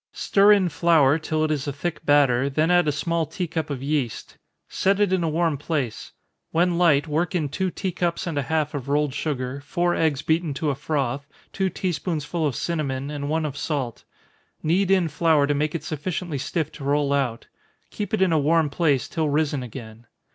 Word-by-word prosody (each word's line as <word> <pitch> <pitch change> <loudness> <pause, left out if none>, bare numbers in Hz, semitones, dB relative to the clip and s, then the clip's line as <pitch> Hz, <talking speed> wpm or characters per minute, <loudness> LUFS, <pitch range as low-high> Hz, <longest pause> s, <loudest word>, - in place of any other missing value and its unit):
Stir 200 +1 +4
in 200 -3 +5
flour, 160 -3 +3
till 155 0 -1
it 155 - 0
is 145 -2 -2
a - - 0
thick 170 +6 -4
batter, 140 -3 +3
then 155 +5 +1
add 175 -2 +4
a - - +3
small 165 +2 -1
tea 180 +4 -3
cup 160 -2 -3
of 135 -2 -4
yeast. 140 -5 -2 0.3
Set 195 +1 +1
it 205 -3 +2
in 185 -2 +1
a 165 - +1
warm 160 -2 0
place 145 -7 -3 0.4
when 175 +1 +1
light, 165 -4 +4
work 160 +4 -1
in 160 -4 +1
two 185 +6 -1
tea 190 +1 -3
cups 170 -1 -2
and 170 -3 -3
a 145 - +1
half 155 +1 -1
of 140 -2 -5
rolled 145 -1 +1
sugar, 140 -2 -3
four 175 +2 0
eggs 155 -3 0
beaten 160 -2 0
to 150 +1 0
a - - -3
froth, 140 -1 -2 0.3
two 190 -1 0
tea 185 +1 -2
spoonsful 160 0 -2
of 135 - -3
cinnamon, 140 -4 -2
and 145 -1 -4
one 160 0 0
of 145 -3 -4
salt. 135 -6 -3 0.6
Knead 180 +5 +2
in 190 -3 +3
flour 155 -1 +3
to 145 - +1
make 150 +2 -1
it 165 - -3
sufficiently 160 0 -3
stiff 155 +3 -2
to 155 - -10
roll 140 0 +1
out 130 -5 -1 0.5
keep 205 -2 -4
it 215 -3 +2
in 185 - +2
a 155 - +3
warm 155 0 +2
place, 145 -8 +1
till 160 -2 -1
risen 145 -1 0
again. 115 -2 -9
155 Hz, 210 wpm, -24 LUFS, 140-170 Hz, 0.6 s, in